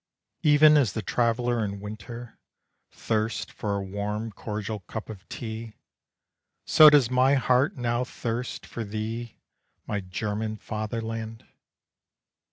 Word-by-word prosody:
Even 150 0 +7
as 130 -9 +2
the 110 - -3
traveller 120 +1 +1
in 100 -1 -4
winter, 110 +3 -8 0.5
thirsts 110 0 -2
For 100 -2 -2
a 100 - -2
warm 105 +3 -3
cordial 105 +1 -4
cup 110 +3 -7
of 100 -2 -12
tea, 110 -1 -6 0.9
So 155 -2 +9
does 140 -5 +4
my 130 +2 +4
heart 130 +1 +2
now 120 0 0
thirst 120 -1 -4
for 115 - -5
thee 110 +2 -5 0.5
My 105 - -2
German 105 +3 -3
fatherland. 110 +1 -5
110 Hz, 120 wpm, -27 LUFS, 105-120 Hz, 0.9 s, So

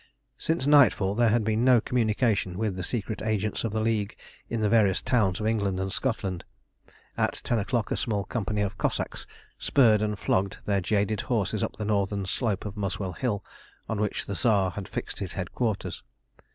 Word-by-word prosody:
Since 160 -4 0
nightfall 120 -10 +5
there 120 +1 +3
had 115 +1 +2
been 110 +2 +1
no 125 -2 +6
communication 110 -5 +1
with 105 -2 -1
the 90 - -4
secret 110 +1 -3
agents 110 -1 -1
of 115 - -1
the 110 - -1
League 110 -2 0 0.3
in 115 - -1
the 105 - +3
various 105 -4 +4
towns 105 -7 +1
of 110 - -3
England 100 -4 0
and 95 0 -2
Scotland. 100 -9 -2 0.8
At - - +1
ten 120 - +1
o'clock 110 +1 -1
a - - +2
small 105 -4 -1
company 105 -1 -2
of 100 +1 -4
Cossacks - - -1 0.3
spurred 115 -6 +4
and 105 -1 -1
flogged 100 0 0
their 100 -1 +1
jaded 105 +2 0
horses 110 -3 -1
up - - -3
the 105 - -3
northern 100 -1 0
slope 105 +1 -1
of 105 -1 -5
Muswell 100 -2 -3
Hill, 105 0 -2 0.4
on 110 - -2
which 105 - -1
the 100 - -4
Tsar 100 -4 +2
had 100 +1 -6
fixed - - -5
his 95 -3 -4
headquarters. 100 +3 -2
105 Hz, 185 wpm, -27 LUFS, 100-115 Hz, 0.8 s, no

